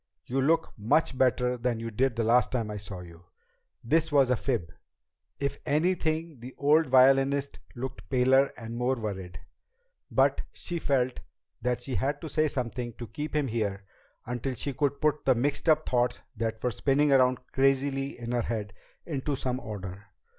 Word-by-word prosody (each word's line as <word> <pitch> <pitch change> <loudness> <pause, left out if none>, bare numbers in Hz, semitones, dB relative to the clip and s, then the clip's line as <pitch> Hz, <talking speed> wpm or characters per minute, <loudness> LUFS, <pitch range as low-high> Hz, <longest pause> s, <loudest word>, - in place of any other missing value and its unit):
You 135 +2 -1
look 160 +5 +2
much 130 +7 +2
better 125 -1 +2
than 120 -1 -1
you 115 0 -5
did 125 +2 +1
the 115 - 0
last 120 +3 +3
time 115 -4 -1
I 105 - -4
saw 100 -2 -7
you." 85 0 -13 0.6
This 160 +6 +2
was 135 -3 +4
a - - +4
fib 115 - -2 0.7
if 140 -1 -2
anything 160 -1 0
the 125 +2 -10
old 150 +3 +4
violinist 135 +2 +4 0.2
looked 130 +1 -6
paler 130 +1 +4
and 115 -1 -7
more 125 +2 +1
worried 95 -6 -5 0.7
but - - +3
she 175 -1 -4
felt 130 -4 0 0.4
that 125 0 -1
she 130 +1 -5
had 140 +3 0
to 160 - -6
say 155 0 +2
something 120 -3 -3
to 120 - -7
keep 150 +7 -6
him 150 -2 +2
here 105 -4 -2 0.4
until 125 +2 -3
she 135 +4 -3
could 140 +1 -1
put 150 -1 +1
the 130 - +4
mixed 140 +6 0
up 155 0 +3
thoughts 120 -1 +1
that 110 0 -3
were 125 - +1
spinning 140 +5 +2
around 130 -1 +5 0.2
crazily 135 0 +1
in 120 0 -5
her 120 -1 +1
head 105 -3 -3 0.3
into 145 -2 -2
some 130 -1 -2
order. 100 -3 -7
130 Hz, 175 wpm, -28 LUFS, 115-140 Hz, 0.7 s, around